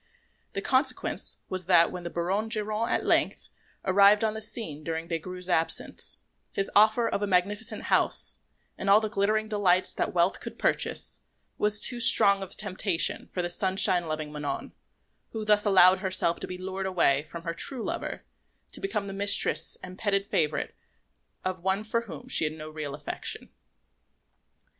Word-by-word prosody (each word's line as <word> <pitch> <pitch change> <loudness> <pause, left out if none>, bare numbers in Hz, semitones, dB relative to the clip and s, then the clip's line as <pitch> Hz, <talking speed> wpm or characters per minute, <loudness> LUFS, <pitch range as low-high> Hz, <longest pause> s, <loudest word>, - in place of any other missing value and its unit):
The 195 - -4
consequence 260 +3 0
was 185 -2 -5
that 175 -2 +4
when 180 - -7
the 170 - -6
Baron 190 +6 -2
Geronte 215 +1 -2
at - - -1
length - - +1 0.4
arrived 200 +3 +5
on 220 -1 0
the 220 - -6
scene 210 -9 -2
during 165 +1 -4
Des 165 -1 -2
Grieux's 180 +2 -6
absence, 165 -3 0 0.3
his 195 - -2
offer 215 +3 +4
of - - -2
a 205 - -1
magnificent 200 +3 -1
house, - - +2 0.4
and 195 - -2
all 200 +2 +7
the 215 -1 -3
glittering 215 +1 0
delights 190 -4 +1
that - - -2
wealth - - +1
could - - -9
purchase, - - -1 0.4
was 210 0 +5
too 245 +2 +4
strong 200 -4 +4
a 195 - -5
temptation 190 -3 0
for 180 - -3
the 175 - -2
sunshine 185 -1 +2
loving 155 -1 -4
Manon, 150 -1 -5 0.6
who 220 -1 -5
thus 210 0 +3
allowed 185 -2 +5
herself 185 -3 -1
to - - -5
be 180 - -7
lured 190 +1 -5
away 155 -7 +2
from 170 -1 -9
her 170 -1 -4
true 245 +7 0
lover - - -5 0.5
to - - -5
become 390 - -3
the 195 - -7
mistress 195 -5 +3
and 185 +1 -10
petted 200 -2 0
favourite 155 -6 -1 0.7
of 185 -1 -3
one 190 +3 -1
for 230 +2 -1
whom 170 -11 -10
she - - +5
had 155 - -2
no 155 0 -9
real 150 -2 -6
affection. 150 0 -4
190 Hz, 170 wpm, -27 LUFS, 170-210 Hz, 0.7 s, all